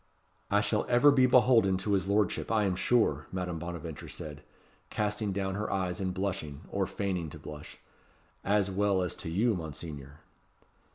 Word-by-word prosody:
"I 105 +1 +3
shall 105 +1 0
ever 125 +4 +6
be 130 -2 +5
beholden 120 -6 +5
to 100 +2 -1
his 95 -2 +1
lordship, 105 +2 +1
I 110 -2 +3
am 95 -3 +1
sure," 90 - +2
Madame 90 -3 -3
Bonaventure 85 -2 -6
said, 75 -1 -7 0.5
casting 105 0 -1
down 95 0 -2
her 105 +2 -3
eyes 95 -1 -1
and 95 -1 -1
blushing, 90 -7 -3
or 100 -1 0
feigning 90 -5 -2
to - - -9
blush, 75 0 -10 0.7
"as 100 -1 +2
well 100 -1 +2
as 90 - -2
to - - -5
you, 110 +8 +2
Monseigneur." 75 -4 -7
95 Hz, 165 wpm, -30 LUFS, 85-105 Hz, 0.7 s, ever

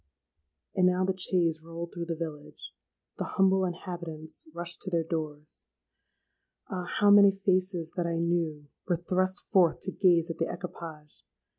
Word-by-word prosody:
"And 185 -1 +4
now 180 +1 +2
the 190 0 0
chaise 170 -4 +1
rolled 165 +1 -7
through 170 -2 -4
the 165 - -2
village: 155 -3 -7 0.5
the - - 0
humble 190 0 +4
inhabitants 170 -4 -6
rushed 170 +1 -4
to 190 - -4
their 170 -2 +1
doors—Ah! 155 - -9
how 205 -1 +5
many 205 -1 +9
faces 185 -3 0
that 175 -2 0
I 165 -1 -1
knew, 165 -3 0 0.2
were 175 -2 +2
thrust 185 +2 0
forth 180 -4 +4
to 190 - -2
gaze 175 -3 +3
at - - -8
the 165 - 0
equipage. 160 -4 -9
170 Hz, 150 wpm, -29 LUFS, 165-185 Hz, 0.5 s, many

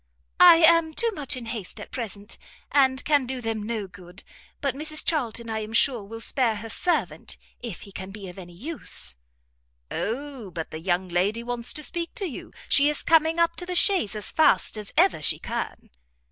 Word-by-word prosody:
"I 355 -1 +10
am 320 -1 +5
too 465 0 +1
much 290 - -2
in 245 - -7
haste 225 -5 -6
at - - -10
present, 210 -3 -6 0.3
and 265 -2 +4
I - - -3
can 290 -4 +2
do 260 0 -3
them 225 -2 -3
no 215 -1 -3
good; 180 0 -13 0.4
but 275 -3 -1
Mrs 310 +2 0
Charlton 235 -8 -1
I 220 -1 -2
am 215 +1 -6
sure 240 -2 +3
will 225 +3 -9
spare 235 -2 +1
her 220 +2 -7
servant, 230 - -1 0.2
if 230 -7 -7
he 200 - -11
can 190 0 -7
be 200 -1 -9
of 180 +1 -10
any 175 -2 -11
use." 245 - -1 0.8
"O 255 -1 -4
but 165 -2 -6
the 155 - -6
young 180 +2 0
lady 195 +6 0
wants 240 0 -1
to 305 - -4
speak 340 +2 -2
to 400 - -3
you; 315 - -7 0.2
she 285 +1 +5
is 300 - 0
coming 325 0 +4
up 335 0 +2
to 355 - -5
the 360 - -3
chaise 360 - +4
as 210 -2 -3
fast 315 - +3
as 210 -2 -6
ever 355 - +4
she - - +3
can." - - -5
235 Hz, 200 wpm, -25 LUFS, 205-305 Hz, 0.8 s, I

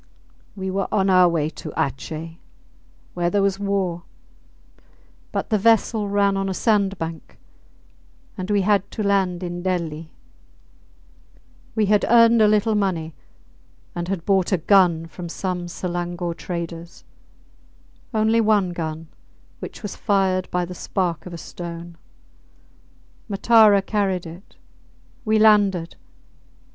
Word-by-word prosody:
We 190 -1 -4
were 195 +1 -1
on 195 -2 +2
our 185 -1 +6
way 160 -3 0
to - - -8
Atjeh, 160 +3 -4 0.7
where 175 -1 0
there 200 +2 +1
was 195 0 0
war; 195 -4 -1 1.3
but - - -3
the 215 - +3
vessel 220 -1 +2
ran 200 -1 +2
on 195 0 -1
a 190 - -3
sandbank, 195 -7 -1 1.0
and 185 -1 -6
we 205 -1 +2
had 200 0 +1
to 215 - -4
land 190 -3 +1
in 175 0 -5
Delli. 165 -4 -3 1.7
We 215 -2 +2
had 205 0 +3
earned 230 0 +6
a 215 - +6
little 215 +1 +2
money, 180 -6 -1 0.8
and 175 0 -4
had 185 -3 -3
bought 190 -2 +2
a 185 - +3
gun 170 -1 +3
from 170 +1 -8
some 180 0 -4
Selangore 175 0 -4
traders; 170 0 -7 1.1
only 220 0 +2
one 210 -4 +2
gun, 160 -1 -5 0.5
which - - -9
was 205 - -5
fired 190 -3 0
by 180 0 -1
the 180 - -8
spark 180 -2 -3
of - - -8
a 170 - -7
stone; 170 +1 -8 1.3
Matara 210 -1 +5
carried 195 -4 -1
it. 170 +4 -12 0.7
We 220 0 +2
landed. 205 -6 +3
185 Hz, 130 wpm, -22 LUFS, 170-205 Hz, 1.7 s, our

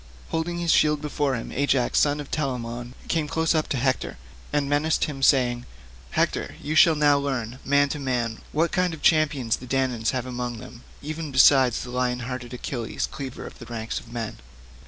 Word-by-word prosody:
Holding 165 +2 -2
this 170 -1 +1
shield 150 -1 +4
before 145 -2 -1
him, 120 - -5
Ajax 135 -2 +2
son 145 0 +2
of 145 - -7
Telamon 120 -4 -3
came 160 -3 0
close 160 +2 +1
up 155 -1 0
to 135 - 0
Hector, 130 - -1 0.3
and 145 -1 +1
menaced 145 +2 +1
him 145 -3 -3
saying, 125 -3 +3 0.4
"Hector, - - -1
you 150 - -3
shall 160 +1 +6
now 145 -1 +4
learn, 130 -3 -3
man 145 +1 +3
to 150 - -3
man, 120 -4 -1
what 165 +2 +1
kind 180 -2 +1
of 155 - -16
champions 145 -7 +3
the 125 - -11
Danaans 125 -3 0
have 130 -2 -2
among 125 -1 -4
them 115 +1 -11 0.2
even 155 0 -5
besides 130 -2 +5
lion 125 0 -1
hearted 125 0 -5
Achilles 120 -2 -3
cleaver 135 -3 -6
of - - -11
the - - -10
ranks 115 -1 -4
of 115 - -15
men. 115 -2 -4
135 Hz, 185 wpm, -25 LUFS, 120-150 Hz, 0.4 s, shall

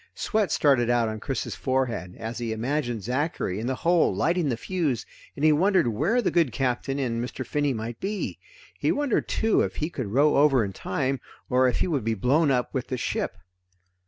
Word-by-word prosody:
Sweat 215 -3 0
started 130 -5 +3
out 120 -2 +2
on 110 0 -5
Chris's 135 +4 -3
forehead, 125 -9 -2
as 115 +1 -5
he 115 -2 -3
imagined 120 -1 -2
Zachary 125 - -1
in 115 - -3
the 130 - 0
hold 170 +3 +2
lighting 170 -2 +1
the 120 - -1
fuse, 150 - -1 0.3
and 145 - 0
he 155 - +7
wondered 180 -2 +3
where 175 - +1
the - - +1
good 165 -7 +2
Captain 135 +2 -1
and 120 -4 -1
Mr. 125 +1 -5
Finney 145 -1 0
might 115 -1 -5
be. 200 +1 -3 0.4
He - - +2
wondered 285 -5 0
too 220 0 +2
if - - -2
he 155 +3 -2
could 130 -9 -4
row 140 +8 +3
over 135 -5 +4
in 95 - -6
time, 130 +9 -2 0.3
or 130 +1 +4
if 125 - 0
he - - +2
would 145 -9 -1
be 115 +1 0
blown 140 - +2
up 125 -2 0
with 130 -2 -2
the 130 - -3
ship. - - -2
130 Hz, 205 wpm, -26 LUFS, 120-155 Hz, 0.4 s, he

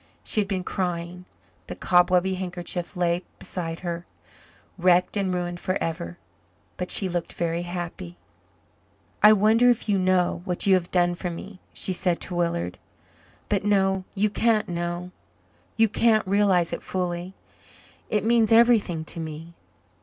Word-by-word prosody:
She 215 - 0
had 200 - -3
been 190 -2 -2
crying 180 -1 -3 0.4
the - - -6
cobwebby 180 +1 +3
handkerchief 180 0 -4
lay 175 0 +1 0.2
beside 165 -2 -5
her, 170 -1 -5 0.7
wrecked 180 +1 +3
and 195 -2 0
ruined 175 -1 -3
forever 175 -1 -3 0.6
but 180 - -4
she 195 - +2
looked 175 -2 -3
very 170 0 -1
happy. 175 - -6 1.0
"I 210 - +9
wonder 220 +4 +4
if 240 -2 +1
you 200 -2 +2
know 185 -2 +1
what 180 -1 -1
you 195 - +5
have 180 -2 +1
done 175 -1 +2
for 175 +1 -4
me," 185 +3 -8
she 190 - -1
said 175 -1 0
to 180 - -4
Willard. 90 - -1 0.7
"But 200 -2 0
no 195 -2 +2
you 205 +1 +1
can't 225 -1 +2
know 175 +1 -4 0.7
you 225 0 +5
can't 220 0 +2
realize 190 -3 +2
it - - -4
fully. 180 0 -3 0.7
It 215 0 0
means 230 -1 +3
everything 225 -8 +4
to 165 - -2
me. 160 +1 -7
180 Hz, 145 wpm, -25 LUFS, 175-200 Hz, 1.0 s, I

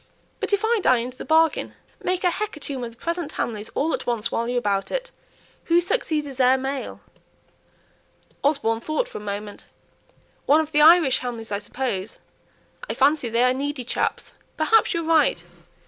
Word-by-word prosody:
"But - - -3
if 405 +2 +2
I 460 0 +2
die 255 -8 +4
into 245 +2 -4
the - - -6
bargain? 320 0 +2 0.3
Make 365 +1 -1
a 355 - +3
hecatomb 300 - -4
of 230 -1 -6
the - - -21
present 335 -1 -3
Hamleys 215 -2 -3
all 315 +3 0
at - - -4
once, 235 -1 -1
while 235 - -1
you 250 - -2
are - - +2
about 200 -4 0
it. - - -4 0.5
Who 340 +1 +4
succeeds 335 -6 0
as 270 -2 -9
heir 255 +1 +5
male?" 270 +1 -5 1.4
Osborne 275 -6 +1
thought 310 - -1
for - - -8
a - - -11
moment. 205 0 -6 0.8
"One 300 +2 +6
of 315 -1 -2
the 300 - +3
Irish 315 -4 +6
Hamleys, 230 -3 -6
I 200 - -1
suppose. 215 -2 -4 0.7
I 225 - -2
fancy 275 -1 +2
they 230 +2 +2
are 250 0 +4
needy 280 0 -3
chaps. 245 - -2 0.2
Perhaps 430 +5 +3
you're 335 - -1
right. 325 -1 +2
275 Hz, 180 wpm, -23 LUFS, 235-325 Hz, 1.4 s, One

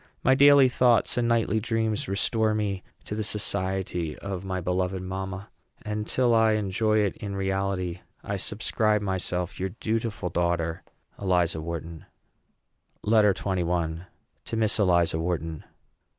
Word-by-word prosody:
My 130 - +5
daily 140 0 +7
thoughts 125 -2 +3
and 120 -1 +1
nightly 115 -2 +2
dreams 110 -1 -1
restore 110 +3 +1
me 100 -3 -1 0.2
to - - -5
the 110 +1 -2
society 95 -5 -1
of 95 -2 -5
my 95 -1 -3
beloved 90 +1 -1
mamma; 95 +1 -5 0.3
and, 105 0 -3
till 125 -2 +2
I 110 -1 +4
enjoy 110 +1 +1
in 100 0 -4
reality, 95 -2 -1 0.2
I 100 - -3
subscribe 105 +1 0
myself 90 -2 -2
your 95 +1 -1
dutiful 110 -2 -3
daughter, 85 -1 -1 0.4
ELIZA 90 -4 +1
WHARTON. 85 0 -6 1.0
LETTER 105 -2 +4
XXI. 85 -2 -2 0.4
TO 115 - -4
MISS 110 -1 +2
ELIZA 85 -4 +3
WHARTON. 80 -2 -3
95 Hz, 130 wpm, -26 LUFS, 90-110 Hz, 1.0 s, daily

